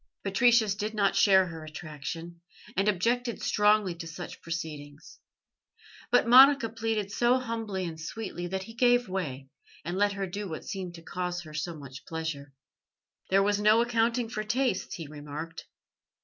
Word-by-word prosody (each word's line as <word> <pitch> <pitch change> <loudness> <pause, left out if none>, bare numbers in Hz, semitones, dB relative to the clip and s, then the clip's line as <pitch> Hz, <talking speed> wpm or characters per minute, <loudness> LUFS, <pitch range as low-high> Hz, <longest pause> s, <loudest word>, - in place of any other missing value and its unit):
Patricius 220 +1 +4
did 210 +2 -4
not 200 -2 +2
share 190 -2 +6
her 165 -2 -8
attraction, 155 +2 -7 0.3
and 195 +3 +1
objected 235 +5 +1
strongly 210 -3 +3
to 170 -1 -8
such 175 +2 -8
proceedings; 155 -3 -7 0.9
but 245 -1 +4
Monica 265 0 +8
pleaded 225 -3 -2
so 240 +3 +3
humbly 225 -6 -3
and 160 -2 -6
sweetly 175 0 -5
that 190 +1 -3
he 225 - -11
gave 245 +1 +3
way, 145 -8 -4 0.4
and 175 +2 -3
let 205 +1 +2
her 195 -1 -3
do 200 +2 -5
what 160 - -6
seemed 185 -4 -5
to 165 - -12
cause 180 0 -3
her 155 -2 -12
so 165 +3 -3
much 140 -2 -10
pleasure. 160 -4 -5 0.8
"There 195 +1 +4
was 205 0 +1
no 215 +2 +5
accounting 235 0 +1
for 215 -2 -4
tastes," 235 -2 -1
he 165 - -6
remarked. 150 +2 -8
190 Hz, 160 wpm, -28 LUFS, 165-225 Hz, 0.9 s, Monica